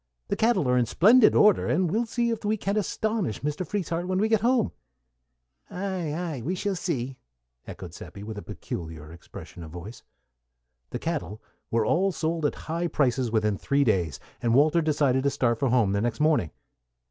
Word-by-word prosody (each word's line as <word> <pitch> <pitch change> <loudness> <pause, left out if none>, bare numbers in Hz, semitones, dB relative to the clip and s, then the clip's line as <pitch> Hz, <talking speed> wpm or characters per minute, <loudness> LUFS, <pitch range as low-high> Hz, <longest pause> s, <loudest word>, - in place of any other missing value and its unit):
"The - - +1
cattle 225 - +2
are 125 0 +3
in 120 - +1
splendid 220 - +6
order, 210 -1 +5
and 175 -1 +1
we'll 230 +4 0
see 235 +1 0
if 225 - -4
we 215 +1 +1
can't 200 0 -2
astonish 210 - -1
Mr. 150 +5 -2
Frieshardt 175 -1 -3
when 185 0 0
we 215 +3 +2
get 220 -2 +3
home." 240 0 +2 1.0
"Ay, 185 -4 -3
ay; 165 -6 -4
we 170 +11 -2
shall 200 +1 -2
see," 135 -7 -3 0.5
echoed - - -8
Seppi, 100 - -10
with 110 +1 -6
a 105 - -6
peculiar 80 -6 -7
expression 85 0 -11
of 80 - -9
voice. 90 +8 -9 0.9
The - - -4
cattle 105 +6 -4 0.3
were 115 -1 +1
all 190 - +2
sold 160 -2 -1
at - - -4
high 170 +2 -1
prices 130 -5 +1
within 105 -3 +1
three 140 +1 +2
days, 90 - 0 0.2
and 115 -1 +2
Walter 155 +5 +4
decided 145 -4 +2
to 140 - +2
start 120 -4 0
for 135 - +1
home 115 -5 +3
the 100 0 0
next 120 0 -1
morning. 150 - +2
150 Hz, 185 wpm, -26 LUFS, 115-190 Hz, 1.0 s, splendid